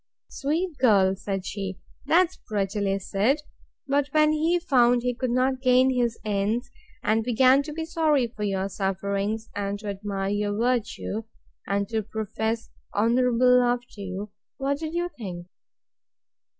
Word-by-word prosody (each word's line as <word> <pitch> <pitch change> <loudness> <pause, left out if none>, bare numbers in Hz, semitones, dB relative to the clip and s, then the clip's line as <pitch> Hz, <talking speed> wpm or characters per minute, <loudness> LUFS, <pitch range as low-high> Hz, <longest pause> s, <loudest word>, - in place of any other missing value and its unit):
Sweet 315 +3 -2
girl! 195 -6 +4
said 195 -1 -4
she; 195 -2 -4 0.3
that's 360 +3 +4
prettily 200 -1 0
said: 215 +10 0 0.4
But 280 +1 +2
when 305 0 +5
he 320 +3 +2
found 245 -8 +3
he 250 0 0
could 255 +1 -2
not 255 +1 +1
gain 255 0 +4
his 240 -2 0
ends, 215 +4 -1 0.3
and 220 +1 +2
began 255 +3 +5
to 300 +2 -7
be 320 +1 -4
sorry 315 -5 +2
for 230 -2 -9
your 195 -2 0
sufferings, 200 +3 -2
and 200 0 -2
to 210 0 -6
admire 195 -1 -3
your 205 0 -1
virtue, 230 -2 -1 0.4
and 200 0 0
to 220 -1 0
profess 220 +1 -3 0.2
honourable 250 +3 +4
love 245 0 +2
to 205 - -10
you, 195 +2 -5 0.3
what 280 +1 -1
did 320 +1 -4
you 345 0 0
think? 180 -5 -6
230 Hz, 150 wpm, -26 LUFS, 200-265 Hz, 0.4 s, when